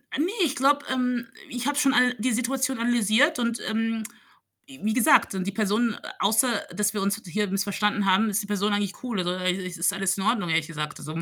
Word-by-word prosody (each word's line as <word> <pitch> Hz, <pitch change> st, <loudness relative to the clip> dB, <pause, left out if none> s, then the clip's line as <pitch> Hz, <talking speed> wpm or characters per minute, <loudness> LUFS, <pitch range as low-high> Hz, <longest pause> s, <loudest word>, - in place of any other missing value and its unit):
Ne, 325 Hz, +7 st, 0 dB
ich 280 Hz, -, -2 dB
glaube, 285 Hz, +2 st, +2 dB
ähm, 250 Hz, -2 st, -1 dB, 0.2 s
ich 245 Hz, +2 st, -4 dB
habe 290 Hz, -, -1 dB
schon 275 Hz, -2 st, +3 dB
all 250 Hz, 0 st, +4 dB
die 245 Hz, +4 st, 0 dB
Situation 255 Hz, +2 st, -1 dB
analysiert 240 Hz, -, +2 dB
und, 235 Hz, -1 st, -1 dB
ähm, 225 Hz, 0 st, -1 dB, 0.6 s
w 270 Hz, -1 st, -14 dB
wie 220 Hz, +1 st, +1 dB
gesagt, 250 Hz, -4 st, +4 dB
und 185 Hz, -1 st, -2 dB
die -, -, -1 dB
Person 215 Hz, +2 st, 0 dB, 0.2 s
außer, 220 Hz, +5 st, +3 dB, 0.3 s
dass 210 Hz, +2 st, +1 dB
wir 205 Hz, -, -2 dB
uns 200 Hz, +3 st, -1 dB
hier 205 Hz, +4 st, -1 dB
missverstanden 200 Hz, +1 st, 0 dB
haben, 195 Hz, +3 st, +3 dB
ist 205 Hz, +1 st, 0 dB
die 200 Hz, -, -9 dB
Person 205 Hz, 0 st, 0 dB
eigentlich 205 Hz, -1 st, -1 dB
cool, 240 Hz, -6 st, -3 dB
also, 180 Hz, -1 st, -1 dB
äh 185 Hz, 0 st, 0 dB
i 185 Hz, 0 st, -5 dB
ist 175 Hz, -1 st, 0 dB
alles 195 Hz, 0 st, 0 dB
in 195 Hz, -, -3 dB
Ordnung, 210 Hz, -4 st, 0 dB
ehrlich 160 Hz, -1 st, +1 dB
gesagt, 150 Hz, -2 st, -5 dB
so. 155 Hz, +2 st, -5 dB
215 Hz, 220 wpm, -25 LUFS, 195-250 Hz, 0.6 s, all